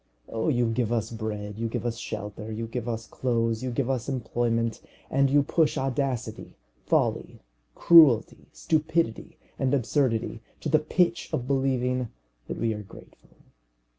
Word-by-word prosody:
Oh, 110 Hz, 0 st, -2 dB
you 120 Hz, -4 st, +2 dB
give 115 Hz, 0 st, 0 dB
us 115 Hz, -1 st, -1 dB
bread, 105 Hz, -2 st, -5 dB
you 115 Hz, -, -1 dB
give 115 Hz, -, -4 dB
us 115 Hz, -1 st, -2 dB
shelter, 105 Hz, 0 st, -6 dB
you 110 Hz, +1 st, -3 dB
give 120 Hz, +1 st, -4 dB
us 115 Hz, -1 st, -3 dB
clothes, 115 Hz, -2 st, -1 dB
you 130 Hz, -, -2 dB
give 120 Hz, +1 st, -1 dB
us 130 Hz, -1 st, -1 dB
employment, 115 Hz, -2 st, -1 dB, 0.3 s
and 135 Hz, 0 st, +3 dB
you 145 Hz, +1 st, +4 dB
push 155 Hz, +1 st, +1 dB
audacity, 135 Hz, -2 st, -2 dB, 0.3 s
folly, -, -, 0 dB, 0.4 s
cruelty, 155 Hz, -10 st, +6 dB
stupidity, 155 Hz, -, -1 dB, 0.2 s
and 135 Hz, +1 st, +2 dB
absurdity 120 Hz, -4 st, 0 dB, 0.2 s
to 155 Hz, -, -2 dB
the 155 Hz, +1 st, +4 dB
pitch 170 Hz, +2 st, +1 dB
of 120 Hz, -, -2 dB
believing 130 Hz, -2 st, 0 dB, 0.4 s
that -, -, -4 dB
we 115 Hz, -1 st, 0 dB
are 105 Hz, -, -6 dB
grateful! 100 Hz, -, -16 dB
120 Hz, 150 wpm, -27 LUFS, 115-135 Hz, 0.4 s, cruelty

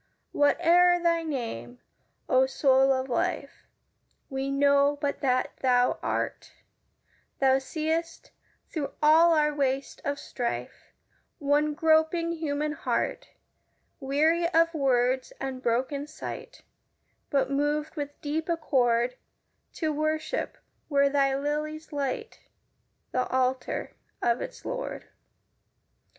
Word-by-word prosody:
Whate'er 350 Hz, +4 st, +4 dB
thy 335 Hz, -1 st, +3 dB
name, 230 Hz, -, -5 dB, 0.5 s
O 260 Hz, 0 st, +4 dB
Soul 265 Hz, 0 st, +3 dB
of 260 Hz, 0 st, 0 dB
Life, 245 Hz, -, -3 dB, 0.6 s
We 270 Hz, 0 st, -2 dB
know 280 Hz, +1 st, +3 dB
but 285 Hz, -1 st, -2 dB
that 255 Hz, -2 st, 0 dB
thou 250 Hz, -1 st, +2 dB
art, -, -, -3 dB, 0.8 s
Thou 265 Hz, 0 st, +4 dB
seest, 320 Hz, +4 st, -3 dB, 0.4 s
through 300 Hz, -4 st, -4 dB
all 325 Hz, +2 st, +6 dB
our 300 Hz, -1 st, +2 dB
waste 275 Hz, -1 st, -1 dB
of 285 Hz, 0 st, -2 dB
strife, 245 Hz, -4 st, -5 dB, 0.5 s
One 295 Hz, +1 st, +1 dB
groping 320 Hz, +1 st, +2 dB
human 300 Hz, -2 st, -2 dB
heart, -, -, -2 dB, 0.7 s
Weary 310 Hz, +5 st, +2 dB
of 330 Hz, -1 st, +3 dB
words 260 Hz, -3 st, +1 dB
and 265 Hz, -1 st, -4 dB
broken 260 Hz, +4 st, -1 dB
sight, 305 Hz, +1 st, -8 dB, 0.7 s
But 275 Hz, -2 st, +1 dB
moved 295 Hz, +3 st, -1 dB
with 290 Hz, -2 st, -5 dB
deep 310 Hz, +3 st, -2 dB
accord 250 Hz, -7 st, +1 dB, 0.6 s
To 315 Hz, -2 st, -1 dB
worship 310 Hz, +8 st, -2 dB, 0.3 s
where 280 Hz, -1 st, +3 dB
thy 275 Hz, -1 st, +2 dB
lilies 305 Hz, +2 st, -3 dB
light 445 Hz, -, -3 dB, 0.7 s
The 255 Hz, -, 0 dB
altar 255 Hz, 0 st, -1 dB, 0.3 s
of 235 Hz, 0 st, +1 dB
its -, -, -8 dB
Lord. -, -, -5 dB
285 Hz, 110 wpm, -27 LUFS, 265-315 Hz, 0.8 s, all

